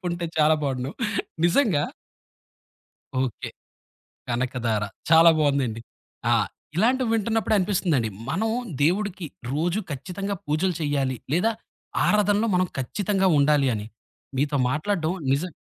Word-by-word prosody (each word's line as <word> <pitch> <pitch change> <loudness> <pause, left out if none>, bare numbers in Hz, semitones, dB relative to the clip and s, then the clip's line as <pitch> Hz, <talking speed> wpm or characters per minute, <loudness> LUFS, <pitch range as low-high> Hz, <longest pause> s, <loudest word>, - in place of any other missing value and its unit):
చెప్పుంటే 175 -1 -3
చాలా 155 +1 +5
బావుండు. 135 -1 -2 0.6
నిజంగా. 175 - +3 1.4
ఓకే. 130 -5 -3 0.8
కనకధార. 120 -3 -1 0.3
చాలా 165 +1 +8
బావుందండి. 140 -6 +1 0.5
ఆ! - - +6 0.4
ఇలాంటివి 240 +5 +2
వింటున్నప్పుడే 225 0 +1
అనిపిస్తుందండి, 175 - +1 0.2
మనం 220 +7 0 0.3
దేవుడికి 185 +3 +1 0.3
రోజు 170 +8 0
ఖచ్చితంగా 195 +8 -4
పూజలు 170 +5 +1
చేయాలి, 140 -3 0 0.2
లేదా 200 +7 +3 0.5
ఆరాధనలో 210 +1 +3
మనం 185 0 +2
ఖచ్చితంగా 190 +8 0
ఉండాలి 140 -1 +4
అని. 105 -1 -4 0.5
మీతో 145 +1 0
మాట్లాడటం 160 +2 0 0.2
నిజం 170 +6 -1
165 Hz, 105 wpm, -25 LUFS, 140-200 Hz, 1.4 s, చాలా